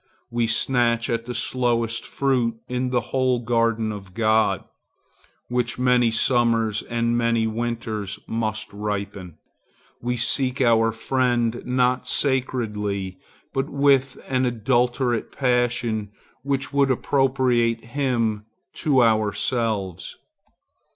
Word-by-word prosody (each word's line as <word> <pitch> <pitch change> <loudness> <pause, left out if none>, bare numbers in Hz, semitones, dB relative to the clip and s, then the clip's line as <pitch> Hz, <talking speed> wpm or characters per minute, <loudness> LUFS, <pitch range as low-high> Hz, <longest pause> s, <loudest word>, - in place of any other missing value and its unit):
We 120 -1 +1
snatch 115 0 +1
at 115 0 -1
the 125 - -4
slowest 115 -2 0
fruit 125 -4 0
in 125 0 -1
the 125 -1 -2
whole 130 -1 +2
garden 115 -2 0
of 95 -3 -9
God, 110 -1 +2 0.8
which 125 -1 -1
many 125 -1 +3
summers 115 -2 +2
and 115 0 -1
many 115 -1 +2
winters 110 -3 -3
must 110 -2 -3
ripen. 100 -4 -5 0.6
We 125 +1 -1
seek 130 +2 +1
our 115 -3 +4
friend 120 0 0
not 125 0 +1
sacredly, 105 -8 -1 0.3
but 135 +2 -1
with 140 -2 +2
an 130 -1 +1
adulterate 120 0 0
passion 120 -4 0 0.3
which 135 +1 -2
would 140 -1 +3
appropriate 125 -3 +1
him 115 -5 -1 0.3
to 135 -5 +3
ourselves. 110 -3 0
120 Hz, 105 wpm, -23 LUFS, 110-125 Hz, 0.8 s, our